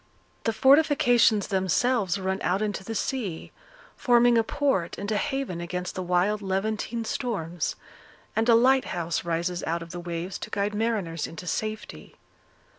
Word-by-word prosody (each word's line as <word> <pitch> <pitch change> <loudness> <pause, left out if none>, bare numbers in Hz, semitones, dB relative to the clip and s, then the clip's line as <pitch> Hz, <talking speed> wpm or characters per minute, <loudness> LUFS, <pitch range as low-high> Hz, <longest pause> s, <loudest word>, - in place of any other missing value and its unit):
The 225 - +2
fortifications 245 -4 +4
themselves 195 +1 +1
run 190 0 -1
out 190 +4 +1
into 205 -2 -3
the 225 +3 -5
sea, 215 - -3 0.4
forming 240 -1 +4
a 230 - +4
port 220 -9 0
and 200 +2 -4
a - - +1
haven 260 -9 -2
against 180 +1 -4
the 185 - -4
wild 180 +4 +1
Levantine 215 +4 -2
storms; 180 - -2 0.6
and 225 +2 +1
a 230 - +8
lighthouse 230 -9 +2
rises 170 +1 -2
out 165 +1 -2
of 165 - -11
the 175 - -6
waves 175 +1 -5
to - - -6
guide 205 +1 -1
mariners 210 -7 -1
into 165 +2 -9
safety. 215 +4 -5
200 Hz, 150 wpm, -26 LUFS, 175-230 Hz, 0.6 s, a